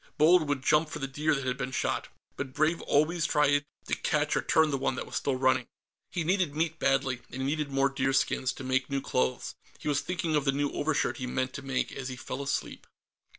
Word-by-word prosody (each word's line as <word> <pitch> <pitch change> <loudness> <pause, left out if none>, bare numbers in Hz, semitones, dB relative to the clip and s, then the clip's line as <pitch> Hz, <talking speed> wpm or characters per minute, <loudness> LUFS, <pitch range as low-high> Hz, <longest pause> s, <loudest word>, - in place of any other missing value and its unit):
Bold 155 0 +5
would 140 -2 -1
jump 155 +2 +3
for - - -5
the 140 - -3
deer 150 +3 0
that 135 -1 -3
had 125 +1 -2
been 125 - -2
shot, - - -1 0.3
but 135 -1 -5
Brave 155 +3 +1
always 160 +3 +2
tried 145 -1 +3 0.2
to - - -4
catch - - +1
or - - +2
turn 160 -1 +3
the 140 - 0
ones 130 - 0
that - - -4
were - - -14
still 140 - 0
running. 130 -1 +2 0.4
He 175 - -2
needed 180 -3 +1
meat 165 +1 -1
badly, 135 -2 +1
and 130 +1 -5
he - - 0
needed 150 0 -1
more 135 0 +2
deerskins, 135 -1 +1
to 130 - -9
make 130 0 0
new 140 -1 -1
clothes. 65 - -1 0.2
He - - -8
was 145 -1 +2
thinking 175 -3 -1
of 150 - +2
the 135 - +4
new 145 +1 0
overshirt 145 -1 0
he 125 - -4
meant 130 +1 -1
to - - -6
make 135 -1 -1
as 135 -1 -5
he 130 - -5
fell 130 +1 -5
asleep.... 140 - -3
140 Hz, 235 wpm, -29 LUFS, 130-155 Hz, 0.4 s, Bold